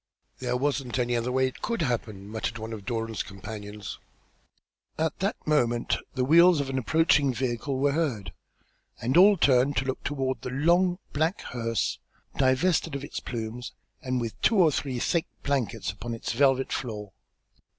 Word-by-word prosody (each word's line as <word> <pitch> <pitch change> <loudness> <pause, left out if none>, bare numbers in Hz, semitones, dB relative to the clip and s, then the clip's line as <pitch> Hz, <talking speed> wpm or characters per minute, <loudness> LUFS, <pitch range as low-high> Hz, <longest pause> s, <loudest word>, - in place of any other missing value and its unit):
"There 125 -1 -1
wasn't 135 -2 -1
any 120 -1 +1
other 120 +1 -1
way 130 +1 +2
it 130 - -5
could 230 -7 -1
happen," 110 -7 -3
muttered 110 +2 -3
one 110 0 -6
of 105 -3 -8
Doran's 115 -3 -2
companions. 105 0 -7 1.0
And 160 - +1
at 160 - -3
that 200 +3 0
moment 120 -6 +2 0.2
the 130 -1 +1
wheels 170 +3 +6
of 135 -1 -2
an 130 - 0
approaching 150 0 +3
vehicle 130 +2 -2
were 140 +2 +2
heard, 125 - -1 0.7
and 125 +5 -1
all 195 +3 +7
turned 135 -2 +3
to 130 - +1
look 130 - -3
toward 135 -2 -2
the - - -5
long 175 +7 +3 0.2
black 160 +6 0
hearse, 115 -2 -2 0.4
divested 140 +4 +2
of 140 - -4
its - - -5
plumes, 120 +1 -5 0.3
and 130 -1 -1
with 115 -2 -5
two 230 - +4
or 175 -6 +5
three 135 -2 -2
thick 165 +7 0 0.2
blankets 120 -7 -1
upon 115 +2 -6
its 115 - -4
velvet 135 +1 +2
floor. 105 -5 -4
130 Hz, 170 wpm, -27 LUFS, 115-145 Hz, 1.0 s, all